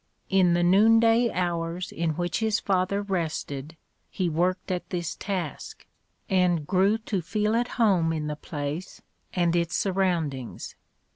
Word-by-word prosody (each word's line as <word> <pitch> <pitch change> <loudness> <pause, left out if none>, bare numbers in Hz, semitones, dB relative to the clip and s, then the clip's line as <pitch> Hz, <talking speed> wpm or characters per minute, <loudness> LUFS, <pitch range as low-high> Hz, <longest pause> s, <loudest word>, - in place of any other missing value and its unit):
In 185 -3 +4
the 175 - +2
noon 210 +6 +6
day 230 +1 +4
hours 175 0 -2
in 165 -2 -1
which 175 +1 -1
his 220 -2 +1
father 195 +1 0
rested, 160 -5 -3 0.3
he 185 -3 -1
worked 180 +4 0
at 180 -1 -3
this 175 -3 -3
task, 185 -7 -5 0.4
and 180 -5 +2
grew 195 +6 +3
to 215 -4 -3
feel 210 +5 0
at 240 +1 +1
home 190 -8 +3
in 155 -2 -2
the 150 0 -3
place 150 +3 -6 0.3
and 175 -2 +1
its 170 0 0
surroundings. 170 - -1
180 Hz, 145 wpm, -26 LUFS, 165-195 Hz, 0.4 s, noon